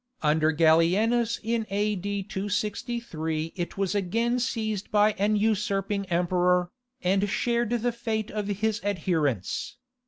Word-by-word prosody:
Under 155 +1 +3
Gallienus 180 +9 +3
in 225 0 -1
A.D. 200 0 -1
263 195 -5 -3
it 175 +1 -4
was 195 -1 0
again 230 +5 0
seized 220 -5 -2
by 210 0 +4
an 210 +2 +2
usurping 205 -2 0
emperor, 180 0 +2 0.3
and 195 +2 +2
shared 235 +2 0
the 240 0 0
fate 225 -2 -3
of 210 -1 -3
his 210 +2 -1
adherents. 160 - -1
205 Hz, 120 wpm, -27 LUFS, 180-220 Hz, 0.3 s, by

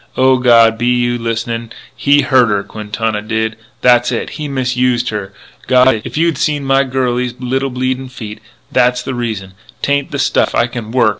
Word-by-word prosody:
O 130 0 +4
God, 115 -3 +5
be 120 - 0
you 120 0 +1
listenin'? 115 0 -3 0.2
He 145 0 +3
hurt 130 -5 +3
her, 100 -1 0
Quintana 105 +1 -3
did. 110 +1 -2 0.3
That's 120 -1 +4
it. 120 - -3
He 150 -1 -5
misused 125 -2 0
her.... 105 -2 -5 0.4
God, 125 -3 +4
if - - -6
you 165 - +3
had 165 -2 0
seen 145 -2 0
my 135 0 +3
girlie's 125 -2 -1
little 135 +2 -1
bleeding 130 +1 -2
feet! 110 -4 -8 0.3
That's 125 0 +2
the 130 - -4
reason.... 110 -6 -4 0.3
'Tain't 140 -1 0
the 140 - -4
stuff. 135 - +1
I - - +3
can 120 -2 -6
work. 120 -3 +3
125 Hz, 180 wpm, -15 LUFS, 115-130 Hz, 0.4 s, God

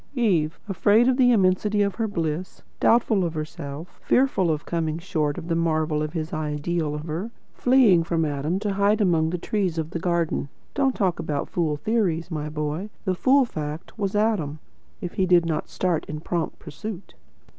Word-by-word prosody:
"Eve, 175 - +1
afraid 210 +5 +4
of 260 - +4
the 250 -2 +5
immensity 205 0 +3
of 200 -1 0
her 225 -1 -1
bliss, 165 -2 -3 0.2
doubtful 225 -4 +3
of 170 -2 -2
herself, 155 +1 -6
fearful 250 -9 +2
of 155 -1 -1
coming 160 -2 -1
short 160 -4 -1
of 170 -2 -6
the 170 - 0
marvel 155 -2 +1
of 155 0 -3
his 160 -2 -4
ideal 155 +1 -2
of 150 - -5
her, 165 +7 -4 0.2
fleeing 245 -9 +5
from 165 -1 0
Adam, 150 +4 -1
to 205 0 -2
hide 200 +2 +2
among 165 -6 +3
the 180 - -2
trees 185 -2 -1
of 160 0 -2
the 170 - -3
garden. 170 -4 0 0.2
Don't 270 -2 +1
talk 185 -6 0
about 145 -3 -2
fool 155 -4 0
theories, 180 -4 0
my 150 -1 -3
boy. 150 +6 -3 0.2
The 185 - +1
fool 265 +8 +4
fact 155 -6 -6
was 200 -1 -1
Adam, 205 -9 +1 0.4
if 175 - -5
he 185 - +1
did 175 -1 +5
not 160 -2 -2
start 175 -4 -1
in 150 0 -6
prompt 170 +1 -3
pursuit." 200 +5 -8
170 Hz, 185 wpm, -24 LUFS, 155-205 Hz, 0.4 s, the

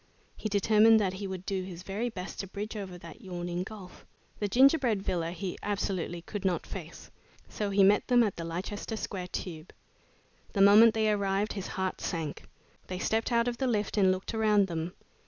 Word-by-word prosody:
He 215 - -4
determined 215 +2 +5
that 190 -3 0
he 200 - -3
would 190 -1 -6
do 195 -2 -1
his 180 -1 -8
very 205 +6 -2
best 185 -5 -7
to 195 - -3
bridge 205 +3 -6
over 190 -4 -6
that 170 +5 -12
yawning 175 -3 -4
gulf. 190 -1 -9 0.4
The 205 - 0
gingerbread 250 -2 +4
villa 170 -4 -1
he 180 +1 -5
absolutely 190 -4 -2
could 205 +2 -6
not 185 -2 0
face, - - -9 0.4
so 210 -1 -3
he 200 0 +4
met 200 +2 +4
them 245 -1 +5
at 205 -4 -1
the 170 - -5
Leicester 190 +6 -4
Square 185 -4 -4
Tube. 170 -2 -6 0.8
The 200 - -2
moment 215 +3 +8
they 220 -1 +2
arrived, 200 0 0
his 195 -3 -5
heart 190 -1 -3
sank. 160 -4 -4 0.4
They 185 - -4
stepped 225 +5 0
out 235 0 +3
of 240 -1 -2
the 265 - +1
lift 210 -4 0
and 195 -3 +4
looked 185 +3 -3
around 215 -2 +3
them. 170 -1 -4
195 Hz, 190 wpm, -29 LUFS, 180-215 Hz, 0.8 s, moment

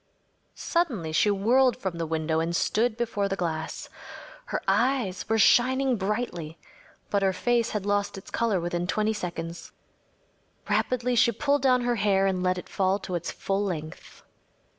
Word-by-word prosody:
Suddenly 250 - -1
she 160 +6 +3
whirled 235 +6 +3
from 180 -3 -4
the 165 - -2
window 160 0 0
and 165 +1 -1
stood 225 +5 +1
before 220 -4 -1
the 195 - -1
glass. 160 -4 -4 0.6
Her - - -2
eyes 245 -9 +1
were 225 - +2
shining 255 +4 +4
brilliantly, 190 -6 -3 0.5
but 200 - +2
her 190 -1 +2
face 235 +3 +1
had 210 -2 -3
lost 205 -1 0
its 190 - -11
color 225 -5 +1
within 175 +1 -2
twenty 215 +3 +1
seconds. 170 -4 -6 1.0
Rapidly 250 0 0
she 235 0 +4
pulled 285 +5 0
down 255 -2 +3
her 240 -1 0
hair 195 -2 +2
and 190 -2 0
let 185 0 +1
it 180 - -7
fall 190 0 +1
to 185 - -7
its 175 -1 -2
full 195 +1 -2
length. 160 -5 -6
200 Hz, 160 wpm, -26 LUFS, 175-240 Hz, 1.0 s, shining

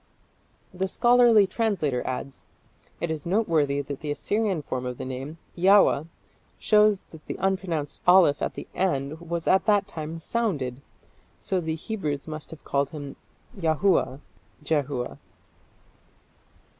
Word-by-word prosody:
The 190 +1 -1
scholarly 240 0 +5
translator 185 - 0
adds, 130 +1 -5 0.5
"It 170 - -2
is 155 -2 -4
noteworthy 165 -8 +1
that 140 -1 -6
the 150 - -6
Assyrian 195 +2 -1
form 130 -2 -4
of 125 -1 -5
the - - -5
name, 135 +5 -6 0.2
Yaua, 185 -4 +5 0.5
shows 210 -2 +4
that 160 -2 -13
the - - -4
unpronounced 185 -6 -1
aleph 180 -5 +6
at - - -2
the - - -7
end 155 -4 -1
was 170 0 -4
at 190 - +3
that 205 -2 +3
time 160 0 -6
sounded, 155 - -2 0.6
so 190 - -2
that 165 - -6
the 160 - 0
Hebrews 155 -6 -4
must 155 -1 -7
have 160 - -11
called 140 0 0
him 145 -3 -7 0.4
Yahua 165 -5 +1 0.4
(Jehua)". 145 -5 -2
160 Hz, 135 wpm, -26 LUFS, 145-195 Hz, 0.6 s, aleph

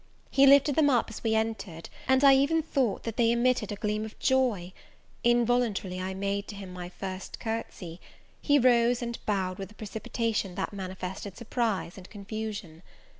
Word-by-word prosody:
He 275 0 +6
lifted 280 +1 +6
them 300 -2 +4
up 240 -4 +2
as 220 - -9
we 220 -1 +2
entered, 220 -7 -2 0.2
and 265 +1 +4
I 275 -1 +9
even 290 +4 +3
thought 265 -9 0
that 230 -1 -5
they 230 -1 +4
emitted 235 -2 +1
a - - -2
gleam 210 +1 -2
of 220 0 -8
joy: 235 -9 +1 0.5
involuntarily 235 -6 +1
I 190 +1 -3
made 200 +1 -2
to 210 - -7
him 195 -2 -8
my 180 -1 -6
first 185 0 -7
courtesy; 215 -6 -5 0.4
he 290 -1 +4
rose 245 -1 +4
and 235 0 -5
bowed 190 -3 -1
with 195 -1 -5
a 215 - -17
precipitation 215 -2 -3
that - - -3
manifested 190 0 -6
surprise 220 -6 -2
and 185 - -13
confusion. 205 -5 -6
220 Hz, 175 wpm, -28 LUFS, 190-245 Hz, 0.5 s, I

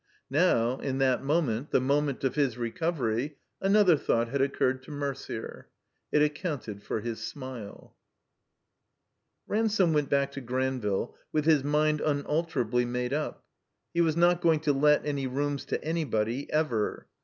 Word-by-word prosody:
Now, 135 -6 +2
in 135 -1 -2
that 135 -1 +2
moment, 140 -4 0
the - - +3
moment 140 +1 0
of 135 - +1
his 140 -6 +1
recovery, 130 +1 -1 0.2
an 195 +1 +3
other 195 -6 +6
thought 115 -5 0
had 140 +2 0
occiured 130 -1 +1
to 130 - -12
Mercier. 140 -5 -5 0.4
It 150 - +4
accounted 150 - -3
for 105 +1 -3
his 115 0 -4
smile. 130 -7 -8 1.5
Ransome 210 -5 +2
went 150 -2 +1
back 140 0 +2
to 135 - -6
Granville 125 -4 -1 0.2
with 155 -1 0
his 155 -4 +4
mind 150 +1 +2
tmalterably 145 -5 0
made 125 +1 -2
up. 150 +1 -3 0.5
He 170 - +2
was 160 -1 +2
not 175 0 +4
going 165 -3 +3
to 150 -2 +2
let 150 +2 +3
any 140 -2 -1
rooms 140 +2 -2
to - - -3
anybody, 135 -6 -1
ever. 150 -9 0
140 Hz, 150 wpm, -28 LUFS, 125-155 Hz, 1.5 s, other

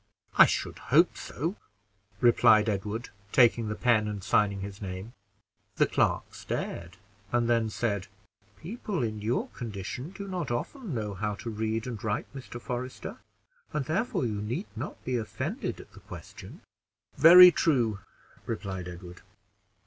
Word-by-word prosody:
"I - - +9
should - - -2
hope - - +4
so," 165 +9 -4 0.6
replied 110 -2 +6
Edward, 105 +3 -2 0.2
taking 120 -3 +4
the 105 - -2
pen 115 -3 +2
and 105 -2 -5
signing 100 -1 +2
his 100 +2 -7
name. 95 +4 -6 0.6
The - - +4
clerk - - 0
stared, 85 +1 -5 0.3
and 120 -1 +2
then 115 -2 +2
said 100 -4 -2 0.5
"People 195 - -4
in 110 -2 -3
your 115 +4 -1
condition 115 - -6
do 200 +1 -8
not 180 -6 -3
often 170 - -4
know 105 -3 -3
how 105 +2 -2
to 115 - -6
read 110 +1 -2
and 120 -5 -6
write, 105 +1 -1
Mr. 130 -3 -8
Forester, 125 +1 -5 0.5
and 150 -3 -1
therefore 190 - 0
you 105 -3 -2
need 120 - -3
not - - -7
be 125 -1 0
offended 135 - -4
at - - -13
the - - -14
question." - - -11 0.5
"Very 180 +2 +10
true," 120 -12 +1 0.5
replied 95 -5 -4
Edward. 90 0 -10
115 Hz, 145 wpm, -28 LUFS, 105-130 Hz, 0.6 s, Very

